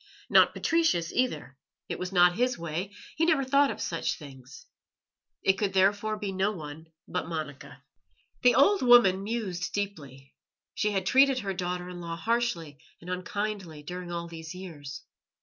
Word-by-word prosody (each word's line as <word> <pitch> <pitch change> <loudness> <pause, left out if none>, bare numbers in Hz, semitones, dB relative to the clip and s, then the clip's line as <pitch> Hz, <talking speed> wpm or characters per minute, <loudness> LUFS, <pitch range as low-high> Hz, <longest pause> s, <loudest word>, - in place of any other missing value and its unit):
Not - - +6
Patricius, 320 - +1
either; 245 - -1 0.3
it - - -4
was 180 +1 -4
not 175 -1 +5
his 250 +2 +1
way, 170 +4 -4 0.3
he 325 - +2
never 315 -4 +3
thought 280 +2 +3
of - - -5
such 165 - -2
things. 135 -3 -12 0.8
It 190 - +3
could 200 -2 0
therefore 205 +3 +2
be 205 -2 -4
no 190 +2 +1
one 160 -3 -8 0.2
but 180 - -3
Monica. 150 -4 -6 0.6
The 250 - +5
old 395 +8 +5
woman 240 -7 +6
mused 195 -5 -3
deeply. 140 -10 -5 0.4
She 210 - 0
had 195 -3 -1
treated 270 +5 +5
her 195 -2 -3
daughter 180 -1 -3
in 180 -1 -8
law 170 -1 -4
harshly 170 - -1 0.2
and 180 +2 -8
unkindly 185 -4 -4
during 180 +2 -6
all 170 0 -4
these 165 +1 -8
years. 150 -7 -8
185 Hz, 160 wpm, -28 LUFS, 165-215 Hz, 0.8 s, Not